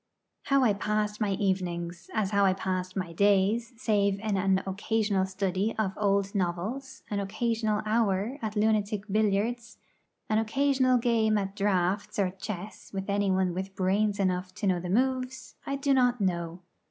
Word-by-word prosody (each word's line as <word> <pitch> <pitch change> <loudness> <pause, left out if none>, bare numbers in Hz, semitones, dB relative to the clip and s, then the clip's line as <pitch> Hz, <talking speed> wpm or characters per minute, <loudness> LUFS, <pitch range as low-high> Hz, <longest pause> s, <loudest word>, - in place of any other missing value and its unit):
How 275 -1 +3
I 220 -4 +4
passed 210 +1 -1
my 205 -2 +1
evenings, 180 -3 -2
as 210 -3 0
how 200 -1 +3
I 190 -1 +4
passed 185 -1 -3
my 185 -3 -3
days, 205 +5 +2
save 200 -4 +1
in 215 -2 -1
an 190 0 +2
occasional 200 0 0
study 190 +2 -1
of 205 -3 0
old 200 -1 +1
novels, 205 +9 -3
an 205 - 0
occasional 220 +1 -1
hour 215 +3 0
at 215 -1 -3
lunatic 210 -1 +1
billiards, 220 +3 0 0.5
an 215 0 +2
occasional 260 +2 +2
game 225 -2 +2
at 195 -1 -3
draughts 195 -1 0
or 195 -3 +1
chess 195 +1 -7
with 195 0 -3
anyone 190 -3 +1
with 190 +2 -5
brains 200 +2 +1
enough 185 -1 -1
to - - -4
know 185 -2 +2
the 175 +1 -5
moves, 255 +4 -1
I 275 - -1
do 275 0 +1
not 245 -2 +3
know. 175 -3 -2
200 Hz, 160 wpm, -28 LUFS, 190-220 Hz, 0.5 s, I